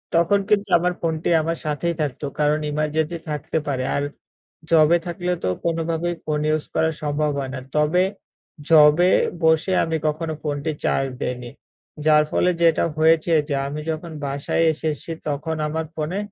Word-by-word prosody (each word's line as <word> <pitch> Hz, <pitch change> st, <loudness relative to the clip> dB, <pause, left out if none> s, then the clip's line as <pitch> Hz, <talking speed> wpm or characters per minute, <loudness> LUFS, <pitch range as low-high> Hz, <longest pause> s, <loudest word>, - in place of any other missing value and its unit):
তখন 170 Hz, +4 st, +4 dB
কিন্তু 205 Hz, -1 st, +2 dB
আমার 180 Hz, +1 st, 0 dB
ফোনটি 160 Hz, -1 st, -1 dB
আমার 165 Hz, +1 st, -2 dB
সাথেই 155 Hz, +3 st, -1 dB
থাকত। 145 Hz, -2 st, -3 dB, 0.2 s
কারণ 150 Hz, +1 st, +2 dB
এমার্জেন্সি 155 Hz, +2 st, -1 dB
থাকতে 150 Hz, +2 st, -3 dB
পারে। 130 Hz, -2 st, -1 dB
আর 140 Hz, -, 0 dB, 0.7 s
জবে 165 Hz, +1 st, +5 dB
থাকলে 175 Hz, +1 st, -2 dB
তো -, -, +1 dB, 0.2 s
কোনোভাবেই 165 Hz, +1 st, -1 dB
ফোন 150 Hz, -1 st, -1 dB
ইউজ 155 Hz, -1 st, 0 dB
করা 160 Hz, -, +2 dB
সম্ভব 150 Hz, 0 st, 0 dB
হয় 135 Hz, -1 st, -3 dB
না। 130 Hz, -, -4 dB, 0.2 s
তবে, 155 Hz, +5 st, +3 dB, 0.7 s
জবে 160 Hz, +3 st, +6 dB, 0.3 s
বসে 160 Hz, +3 st, +3 dB
আমি 165 Hz, 0 st, -1 dB
কখনো 155 Hz, +1 st, -2 dB
ফোনটি 150 Hz, +1 st, -2 dB
চার্জ 135 Hz, 0 st, +1 dB
দেইনি। 125 Hz, -1 st, -4 dB, 0.6 s
যার 150 Hz, -1 st, +6 dB
ফলে 180 Hz, -, +2 dB
যেটা 165 Hz, -1 st, +4 dB
হয়েছে 160 Hz, +1 st, +3 dB, 0.2 s
যে, 145 Hz, -, -1 dB
আমি 150 Hz, +2 st, -4 dB
যখন 160 Hz, +1 st, -5 dB
বাসায় 140 Hz, +3 st, -1 dB
এসেছি 155 Hz, +1 st, -4 dB, 0.2 s
তখন 150 Hz, +3 st, -2 dB
আমার 160 Hz, +1 st, -2 dB
ফোনে 160 Hz, +5 st, -3 dB
155 Hz, 155 wpm, -22 LUFS, 150-165 Hz, 0.7 s, জবে